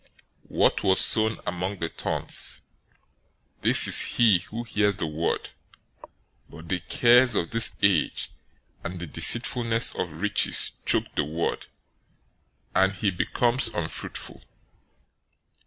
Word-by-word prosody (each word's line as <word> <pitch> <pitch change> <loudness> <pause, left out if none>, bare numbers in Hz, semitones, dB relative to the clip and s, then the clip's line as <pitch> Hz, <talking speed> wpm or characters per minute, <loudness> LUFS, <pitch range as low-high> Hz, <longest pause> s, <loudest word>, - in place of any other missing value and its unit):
013:022 - - -33 0.4
What - - -1
was 95 - +1
sown 110 0 +1
among 90 +3 -5
the 85 - -4
thorns, - - -5 1.0
this - - +7
is - - +7
he 110 -6 +2
who 110 +6 -9
hears 105 -3 -1
the 95 - -2
word, 80 +1 -5 1.0
but 85 0 -14
the 95 - -2
cares 120 +2 +2
of 85 - -3
this 115 0 +4
age 100 -5 0 0.5
and 90 +1 -8
the 90 - -7
deceitfulness 115 - +2
of 80 -2 -7
riches 105 - +3 0.2
choke - - +1
the - - -2
word, 80 +3 -5 1.1
and 95 0 +1
he 95 +1 -3
becomes 120 +7 -1
unfruitful. 85 -7 -4
95 Hz, 125 wpm, -23 LUFS, 85-115 Hz, 1.1 s, this